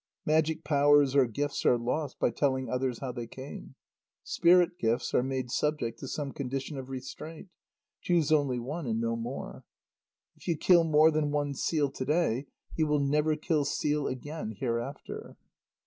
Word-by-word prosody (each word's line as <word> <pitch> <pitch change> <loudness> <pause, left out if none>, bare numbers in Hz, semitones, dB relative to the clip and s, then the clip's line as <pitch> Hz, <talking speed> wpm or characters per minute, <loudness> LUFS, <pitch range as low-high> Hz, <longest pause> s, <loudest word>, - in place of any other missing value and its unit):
Magic 160 +1 +1
powers 145 -1 +4
or 135 -3 +5
gifts 145 +5 -2
are 120 - +4
lost 125 +4 -2
by - - +1
telling 130 +1 0
others 125 -1 -1
how 130 -2 -3
they 120 -2 -6
came. 135 +2 -9 0.5
Spirit 175 +1 +4
gifts 115 +2 0
are - - +4
made 130 -1 -3
subject 150 -7 -1
to 135 - -6
some 140 0 -3
condition 135 +2 -4
of 135 -1 -7
restraint: 155 +7 -8 0.5
"Choose 165 -4 +1
only 140 -5 +3
one 140 +5 -4
and 115 -1 0
no 115 0 0
more." 120 +4 -6 0.7
"If - - -17
you 170 -3 +1
kill 170 +1 +5
more 155 0 +5
than 155 -1 0
one 145 -1 -1
seal 145 0 0
to 130 - -4
day, 145 -4 +1 0.3
you 160 -1 +1
will 150 0 +2
never 150 +2 +2
kill 155 -1 0
seal 145 +1 0
again 130 -3 -5
hereafter." 120 +4 -4
140 Hz, 165 wpm, -29 LUFS, 130-155 Hz, 0.7 s, or